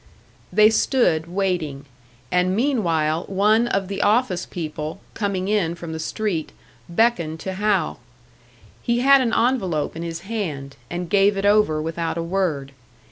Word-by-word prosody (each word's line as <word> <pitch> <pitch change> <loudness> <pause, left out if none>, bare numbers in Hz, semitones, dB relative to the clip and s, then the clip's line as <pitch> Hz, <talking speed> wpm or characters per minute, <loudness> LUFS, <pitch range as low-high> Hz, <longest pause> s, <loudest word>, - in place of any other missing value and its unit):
They 215 +1 +6
stood 195 - +2
waiting; 175 -7 -2 0.5
and 180 +1 +2
meanwhile, 170 - +1
one 210 +4 +3
of 195 -4 -1
the 195 0 -3
office 205 -4 +1
people, 155 0 -5
coming 200 -3 -2
in 195 -5 +1
from 170 -1 -7
the 160 - -5
street, 170 0 -3 0.4
beckoned 170 -5 +1
to 190 - -4
Hal. 205 0 0 0.8
He 235 0 0
had 275 +1 +6
an 240 -3 0
envelope 220 - 0
in 165 - -5
his 170 0 -5
hand, 170 -10 -4
and 175 0 -4
gave 200 +2 +3
it 195 - -1
over 205 -7 +3
without 165 +1 -3
a 165 - -1
word. 165 -6 -1
185 Hz, 145 wpm, -22 LUFS, 165-210 Hz, 0.8 s, They